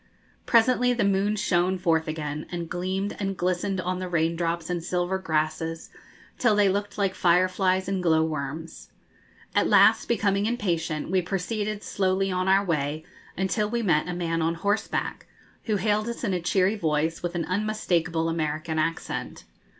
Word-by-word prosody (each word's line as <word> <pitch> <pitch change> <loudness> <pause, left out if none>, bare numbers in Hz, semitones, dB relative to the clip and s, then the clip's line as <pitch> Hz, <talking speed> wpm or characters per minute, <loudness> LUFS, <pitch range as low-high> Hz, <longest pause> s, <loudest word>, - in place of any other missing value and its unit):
Presently 245 +1 +4
the 240 - 0
moon 200 +1 +2
shone 185 -2 +1
forth 165 -3 +1
again, 150 -1 -4
and 170 -1 -4
gleamed 185 +3 -2
and 195 -2 -2
glistened 185 +2 -1
on 185 0 -2
the 185 -1 -4
rain 165 -1 +1
drops 170 -1 -2
and 175 -2 -2
silver 180 +2 -1
grasses 160 -1 -2 0.5
till 240 -4 +3
they 205 -1 +4
looked 205 +1 -2
like 195 -2 +1
fireflies 185 +1 +2
and 195 -1 -1
glowworms. 160 -2 -1 0.6
At - - +3
last, - - +5
becoming 205 -3 +1
impatient, 170 -9 -2
we 190 -1 +3
proceeded 205 +3 -3
slowly 190 0 0
on 185 0 -1
our 195 +1 +4
way, 155 -2 -1 0.3
until 190 +3 0
we 235 +1 -1
met 160 -5 +2
a 180 - -3
man 165 -1 -1
on 165 +1 0
horseback, 205 +5 -2 0.4
who 215 - +1
hailed 210 +3 0
us 235 - -6
in 200 -5 0
a 180 - -1
cheery 190 +4 +2
voice 160 -3 0
with 175 0 -3
an 165 -2 -1
unmistakable 180 -4 0
American 160 0 -2
accent. 165 +1 -3
180 Hz, 160 wpm, -26 LUFS, 165-200 Hz, 0.6 s, last